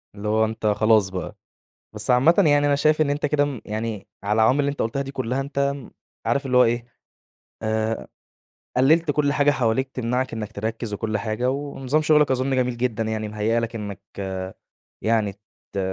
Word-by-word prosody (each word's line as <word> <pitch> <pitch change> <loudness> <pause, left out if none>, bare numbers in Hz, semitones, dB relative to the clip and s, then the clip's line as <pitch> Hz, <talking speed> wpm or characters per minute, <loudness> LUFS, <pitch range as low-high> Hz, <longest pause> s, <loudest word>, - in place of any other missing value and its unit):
اللي 105 +1 -5
هو 110 +1 +3
أنت 110 0 -5
خلاص 105 -1 +3
بقى. 95 -1 -5 0.6
بس 105 +3 -2
عامةً 125 +7 +5
يعني 145 -6 +5
أنا 145 - +3
شايف 155 +2 +2
إن 150 -2 +3
أنت 145 +1 0
كده 145 0 +2
م 140 -5 -4
يعني 110 -1 -4 0.2
على 100 - 0
العوامل 115 +6 +4
اللي 140 0 +1
أنت 145 - -3
قلتها 125 +5 -1
دي 135 0 -7
كلها، 130 0 -2
أنت 140 0 -1 0.5
عارف 140 0 +1
اللي 125 -1 +1
هو 125 - +8
إيه، 120 0 0 0.8
آآ، 110 0 -1 0.7
قلّلت 155 +5 +4
كل 145 -1 +1
حاجة 145 0 +3
حواليك 130 -1 +1
تمنعك 125 +1 -2
إنك 110 -2 -5
تركّز، 110 +1 -4
وكل 110 +1 -2
حاجة، 110 +4 -1
و 135 - -1 0.2
ونظام 135 +4 0
شغلك 150 -1 +4
أظن 130 +1 +1
جميل 125 -1 0
جدًا، 120 -2 -1
يعني 110 -1 -2
مهيّأ 110 +2 0
لك 115 0 -4
إنك 100 -3 -5 1.0
يعني 110 -2 +1 0.4
ت 100 - -4
120 Hz, 185 wpm, -23 LUFS, 110-140 Hz, 1.0 s, هو